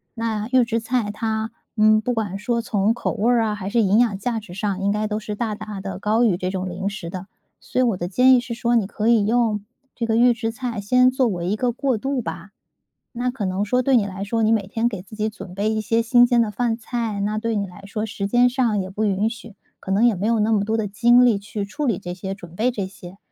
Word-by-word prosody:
那 220 Hz, -2 st, -2 dB
预 260 Hz, -1 st, +5 dB
制 230 Hz, 0 st, -1 dB
菜 225 Hz, -2 st, -1 dB
它， 220 Hz, +1 st, -2 dB, 0.3 s
嗯， 215 Hz, 0 st, +5 dB
不 245 Hz, +3 st, -1 dB
管 205 Hz, -3 st, -2 dB
说 235 Hz, +3 st, -1 dB
从 215 Hz, 0 st, +1 dB
口 -, -, -2 dB
味 230 Hz, +1 st, +1 dB
儿 235 Hz, -2 st, +3 dB
啊 215 Hz, -, 0 dB
还 195 Hz, -2 st, -5 dB
是 230 Hz, +2 st, +2 dB
营 205 Hz, +2 st, +3 dB
养 220 Hz, -5 st, +2 dB
价 230 Hz, +2 st, -2 dB
值 195 Hz, -4 st, -11 dB
上， 200 Hz, -2 st, -2 dB
应 200 Hz, -, +1 dB
该 210 Hz, +1 st, -1 dB
都 210 Hz, 0 st, -2 dB
是 210 Hz, -1 st, -5 dB
大 220 Hz, -1 st, -2 dB
大 210 Hz, -1 st, -7 dB
地 190 Hz, -1 st, -6 dB
高 220 Hz, +4 st, +2 dB
于 205 Hz, -7 st, +3 dB
这 185 Hz, 0 st, -2 dB
种 185 Hz, -1 st, -3 dB
零 190 Hz, +3 st, -4 dB
食 200 Hz, -4 st, -7 dB
的， 185 Hz, +2 st, -7 dB, 0.3 s
所 -, -, -8 dB
以 -, -, +4 dB
我 230 Hz, -6 st, +1 dB
的 175 Hz, -, -3 dB
建 250 Hz, +8 st, +5 dB
议 255 Hz, -, +6 dB
是 245 Hz, -1 st, -5 dB
说 235 Hz, 0 st, +1 dB
你 205 Hz, -4 st, 0 dB
可 220 Hz, +1 st, -1 dB
以 225 Hz, -3 st, +4 dB
用 220 Hz, -2 st, +1 dB, 0.3 s
这 235 Hz, -, -3 dB
个 225 Hz, -, 0 dB
预 245 Hz, +1 st, +5 dB
制 225 Hz, 0 st, -3 dB
菜 235 Hz, -2 st, -4 dB
先 250 Hz, +5 st, +4 dB
作 260 Hz, -1 st, +2 dB
为 175 Hz, -4 st, -2 dB
一 210 Hz, -, 0 dB
个 245 Hz, +1 st, 0 dB
过 260 Hz, -1 st, 0 dB
渡 270 Hz, +3 st, -2 dB
吧。 -, -, -7 dB, 0.7 s
那 250 Hz, +1 st, 0 dB
可 240 Hz, -5 st, -5 dB
能 190 Hz, +2 st, -1 dB
说 250 Hz, +5 st, +1 dB
对 265 Hz, +1 st, +2 dB
你 210 Hz, -4 st, +2 dB
来 195 Hz, +1 st, -5 dB
说， 225 Hz, +2 st, -1 dB
你 215 Hz, -, +3 dB
每 215 Hz, -4 st, +1 dB
天 225 Hz, +3 st, 0 dB
给 205 Hz, -6 st, -6 dB
自 190 Hz, +4 st, -13 dB
己 215 Hz, 0 st, -1 dB
准 195 Hz, -4 st, -10 dB
备 205 Hz, +2 st, 0 dB
一 220 Hz, 0 st, 0 dB
些 225 Hz, +2 st, +1 dB
新 240 Hz, +1 st, +5 dB
鲜 240 Hz, -1 st, +3 dB
的 220 Hz, -, -1 dB
饭 225 Hz, +2 st, -1 dB
菜， 225 Hz, -3 st, -3 dB
那 210 Hz, +2 st, -1 dB
对 230 Hz, 0 st, -1 dB
你 205 Hz, -, 0 dB
来 195 Hz, +3 st, -13 dB
说 215 Hz, +2 st, -3 dB
时 200 Hz, -1 st, -4 dB
间 245 Hz, +4 st, +4 dB
上 240 Hz, -5 st, +1 dB
也 185 Hz, -, -5 dB
不 210 Hz, +3 st, -2 dB
允 205 Hz, +2 st, +1 dB
许， 230 Hz, -2 st, -10 dB, 0.2 s
可 190 Hz, -, -5 dB
能 210 Hz, +5 st, +3 dB
也 230 Hz, -5 st, +4 dB
没 195 Hz, -, -2 dB
有 230 Hz, -1 st, +2 dB
那 215 Hz, +1 st, +2 dB
么 205 Hz, -2 st, +2 dB
多 220 Hz, +2 st, 0 dB
的 215 Hz, -2 st, -1 dB
精 240 Hz, +5 st, +5 dB
力 230 Hz, -5 st, +4 dB
去 205 Hz, 0 st, -5 dB
处 285 Hz, +9 st, -4 dB
理 225 Hz, -, +1 dB
这 175 Hz, -, -6 dB
些， 190 Hz, +2 st, -5 dB
准 175 Hz, -3 st, -13 dB
备 245 Hz, +3 st, +1 dB
这 200 Hz, -5 st, -3 dB
些， 190 Hz, 0 st, -13 dB
215 Hz, 295 characters per minute, -22 LUFS, 200-235 Hz, 0.7 s, 议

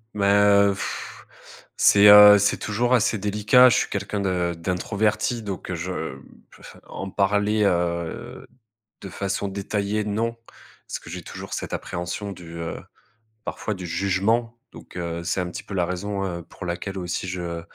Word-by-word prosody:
Mais, 100 Hz, -1 st, 0 dB
heu, 100 Hz, 0 st, +5 dB
pff -, -, -7 dB, 0.5 s
c'est, 100 Hz, 0 st, +6 dB
heu, 105 Hz, 0 st, +10 dB
c'est 100 Hz, -, +2 dB
toujours 120 Hz, +4 st, -1 dB
assez 110 Hz, -1 st, +1 dB
délicat. 105 Hz, +5 st, +5 dB
Je -, -, +2 dB
suis -, -, 0 dB
quelqu'un 100 Hz, 0 st, -3 dB
de 90 Hz, -3 st, 0 dB
d'introverti, 105 Hz, +6 st, -1 dB
donc 100 Hz, -3 st, -6 dB
heu, 90 Hz, -, -2 dB
je 85 Hz, +2 st, -4 dB, 0.7 s
f -, -, -13 dB
en 95 Hz, 0 st, -7 dB
parler, 105 Hz, +2 st, +1 dB
heu, 85 Hz, -3 st, -2 dB, 0.6 s
de 100 Hz, -, -8 dB
façon 100 Hz, +1 st, -3 dB
détaillée, 100 Hz, +2 st, -2 dB
non. 115 Hz, +3 st, -1 dB, 0.5 s
Parce -, -, -4 dB
que -, -, -13 dB
j'ai 90 Hz, +1 st, -6 dB
toujours -, -, -8 dB
cette -, -, -5 dB
appréhension 90 Hz, +4 st, -4 dB
du, 85 Hz, -3 st, -10 dB
heu, 85 Hz, -1 st, -5 dB, 0.7 s
parfois, 110 Hz, -, -4 dB
du 90 Hz, -1 st, -7 dB
jugement. 100 Hz, +7 st, 0 dB
Donc, -, -, -12 dB
heu, 85 Hz, -1 st, -4 dB
c'est 90 Hz, +2 st, -1 dB
un 90 Hz, -, -3 dB
petit -, -, -7 dB
peu 100 Hz, -, -7 dB
la 90 Hz, -2 st, +1 dB
raison, 95 Hz, +3 st, -3 dB
heu, 85 Hz, -2 st, -4 dB
pour 90 Hz, -, -11 dB
laquelle 90 Hz, +3 st, -4 dB
aussi 90 Hz, 0 st, -3 dB
je 85 Hz, -2 st, -4 dB
100 Hz, 165 wpm, -23 LUFS, 90-105 Hz, 0.7 s, heu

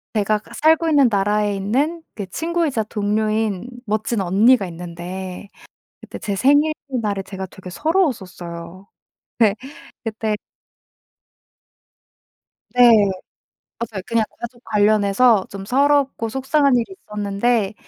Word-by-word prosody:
제가 210 Hz, 0 st, +1 dB
그 -, -, -20 dB
살고 320 Hz, +1 st, +3 dB
있는 285 Hz, -4 st, +5 dB
나라에 205 Hz, 0 st, +1 dB
있는 275 Hz, -, -1 dB
그 205 Hz, -, -4 dB
친구이자 320 Hz, -, -1 dB
동료인 215 Hz, 0 st, -1 dB, 0.2 s
멋진 215 Hz, 0 st, -1 dB
언니가 200 Hz, +5 st, +4 dB
있는데 180 Hz, +3 st, -7 dB, 0.5 s
그때 -, -, -9 dB
제 200 Hz, -2 st, -3 dB
생일날에 265 Hz, -6 st, +1 dB
제가 190 Hz, -1 st, -6 dB
되게 185 Hz, 0 st, -12 dB
서러웠었어요. 185 Hz, -, -2 dB, 0.5 s
네. 215 Hz, -3 st, +4 dB, 0.5 s
그때 220 Hz, -1 st, -2 dB, 2.4 s
네. 250 Hz, -, +6 dB, 1.0 s
맞아요. 215 Hz, -5 st, -5 dB
그냥 230 Hz, -1 st, +1 dB, 0.2 s
가족 235 Hz, 0 st, -8 dB
관련해서 210 Hz, 0 st, +3 dB
좀 195 Hz, -1 st, -7 dB
서럽고 275 Hz, 0 st, +2 dB
속상한 265 Hz, +2 st, +2 dB
일이 240 Hz, +11 st, -2 dB
있었는데 210 Hz, +1 st, 0 dB
215 Hz, 245 characters per minute, -20 LUFS, 195-255 Hz, 2.4 s, 네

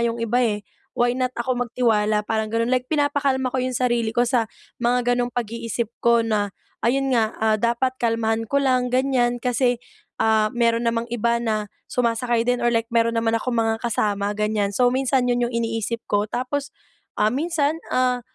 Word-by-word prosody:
'yong 235 Hz, 0 st, 0 dB
iba, 230 Hz, +1 st, 0 dB
eh, 210 Hz, -4 st, 0 dB, 0.3 s
why 240 Hz, 0 st, +3 dB
not 255 Hz, 0 st, -1 dB
ako 245 Hz, +1 st, -1 dB
magtiwala 215 Hz, -3 st, +1 dB
parang 220 Hz, 0 st, -1 dB
ganun. 230 Hz, +2 st, 0 dB
Like 255 Hz, 0 st, 0 dB
pinapakalma 285 Hz, -3 st, +1 dB
ko -, -, -1 dB
yung 255 Hz, 0 st, -1 dB
sarili 240 Hz, -2 st, 0 dB
ko 240 Hz, -, +4 dB
sa 245 Hz, -3 st, +2 dB, 0.4 s
mga 245 Hz, 0 st, +2 dB
ganong 245 Hz, 0 st, -1 dB
pag-iisip 235 Hz, -1 st, -3 dB, 0.2 s
ko 235 Hz, 0 st, +5 dB
na, 205 Hz, -3 st, 0 dB, 0.3 s
ayun 270 Hz, +3 st, +2 dB
nga, 225 Hz, -2 st, +2 dB
ah, 220 Hz, 0 st, +2 dB
dapat 240 Hz, +2 st, 0 dB
kalmahan 225 Hz, -1 st, 0 dB
ko 280 Hz, +5 st, 0 dB
lang 255 Hz, -2 st, +1 dB
ganyan. 250 Hz, -2 st, +1 dB
Kasi, 245 Hz, 0 st, +1 dB, 0.4 s
ah, 220 Hz, 0 st, +3 dB
mayroon 235 Hz, -1 st, +1 dB
namang 230 Hz, 0 st, 0 dB
iba 235 Hz, 0 st, 0 dB
na 215 Hz, -3 st, -2 dB, 0.2 s
sumasakay 235 Hz, -1 st, 0 dB
din 245 Hz, 0 st, +1 dB
or 240 Hz, -, +2 dB
like 230 Hz, 0 st, 0 dB
meron 230 Hz, 0 st, +2 dB
naman 225 Hz, 0 st, +1 dB
akong 235 Hz, +1 st, -1 dB
mga 225 Hz, 0 st, +1 dB
kasama 205 Hz, -3 st, -1 dB
ganyan. 210 Hz, -1 st, 0 dB
So, 245 Hz, +5 st, +2 dB
minsan 265 Hz, -1 st, +1 dB
yun 245 Hz, -, 0 dB
yung 240 Hz, -, -9 dB
iniisip 230 Hz, 0 st, -2 dB
ko. 205 Hz, 0 st, 0 dB
Tapos, 270 Hz, +4 st, -3 dB, 0.5 s
ah, 215 Hz, +1 st, +2 dB
minsan, 315 Hz, +2 st, 0 dB
ah, 250 Hz, -1 st, +1 dB
235 Hz, 180 wpm, -23 LUFS, 225-250 Hz, 0.5 s, ko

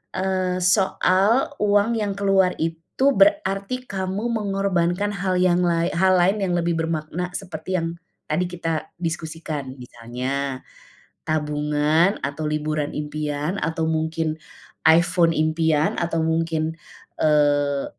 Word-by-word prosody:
eee, 185 Hz, -1 st, 0 dB
soal 195 Hz, +6 st, +2 dB
uang 205 Hz, +2 st, +3 dB
yang 205 Hz, -2 st, -1 dB
keluar 195 Hz, -2 st, +3 dB
itu 165 Hz, +12 st, 0 dB
berarti 255 Hz, -5 st, +2 dB
kamu 190 Hz, +3 st, -3 dB
mengorbankan 195 Hz, -3 st, 0 dB
hal 185 Hz, -1 st, -1 dB
yang 180 Hz, -1 st, +3 dB
lae 170 Hz, 0 st, +1 dB
hal 185 Hz, +2 st, +3 dB
lain 190 Hz, +4 st, +3 dB
yang 180 Hz, -2 st, 0 dB
lebih 170 Hz, 0 st, 0 dB
bermakna 160 Hz, +2 st, -2 dB
seperti 185 Hz, -1 st, -5 dB
yang 165 Hz, 0 st, -3 dB, 0.3 s
tadi 160 Hz, +4 st, +1 dB
kita 165 Hz, -3 st, -3 dB
diskusikan, 160 Hz, -5 st, -4 dB
misalnya 130 Hz, +3 st, -4 dB, 0.6 s
tabungan 150 Hz, +4 st, +1 dB
atau 145 Hz, +3 st, -3 dB
liburan 150 Hz, 0 st, -1 dB
impian, 150 Hz, +2 st, -3 dB
atau 160 Hz, 0 st, -1 dB
mungkin 160 Hz, 0 st, -1 dB, 0.5 s
iPhone 170 Hz, +1 st, +5 dB
impian 155 Hz, 0 st, +1 dB
atau 170 Hz, -1 st, -1 dB
mungkin, 160 Hz, 0 st, 0 dB, 0.5 s
eee, 145 Hz, -2 st, +2 dB
165 Hz, 115 wpm, -23 LUFS, 155-190 Hz, 0.6 s, iPhone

